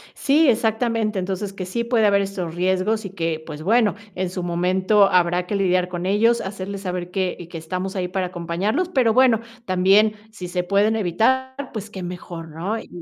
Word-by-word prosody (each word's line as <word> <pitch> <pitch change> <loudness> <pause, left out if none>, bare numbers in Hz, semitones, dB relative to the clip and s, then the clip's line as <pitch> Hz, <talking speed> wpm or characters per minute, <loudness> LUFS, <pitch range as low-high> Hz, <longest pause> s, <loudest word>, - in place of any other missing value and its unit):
Sí, 295 +1 +3
exactamente, 225 -2 +1
entonces 190 +2 -3
que 190 -2 -5
sí 235 +6 -2
puede 235 -2 +2
haber 200 -1 +4
estos 185 -4 -4
riesgos 190 +4 0
y - - -4
que, 165 -4 -3
pues 155 -1 -8
bueno, 215 0 +3 0.2
en 185 0 -2
su 180 0 -5
momento 185 +4 +3
habrá 180 0 +2
que 205 - -2
lidiar 185 -2 +2
con 175 0 -4
ellos, 225 +5 +3
hacerles 195 0 -5
saber 180 -2 -4
que 185 -2 -1
y 175 - -9
que 170 - -8
estamos 185 +4 -4
ahí 185 -2 -1
para 185 0 -2
acompañarlos, 180 - -2
pero 250 -9 +2
bueno, 245 -2 +4 0.2
también 195 +3 +4 0.2
si 185 -5 -7
se 180 0 -2
pueden 200 +4 +2
evitar 225 +7 +1 0.2
pues 215 -1 -5
qué 190 -3 -7
mejor, 175 -2 -7
¿no?, 175 +8 -3
y - - -11
190 Hz, 195 wpm, -22 LUFS, 180-220 Hz, 0.2 s, haber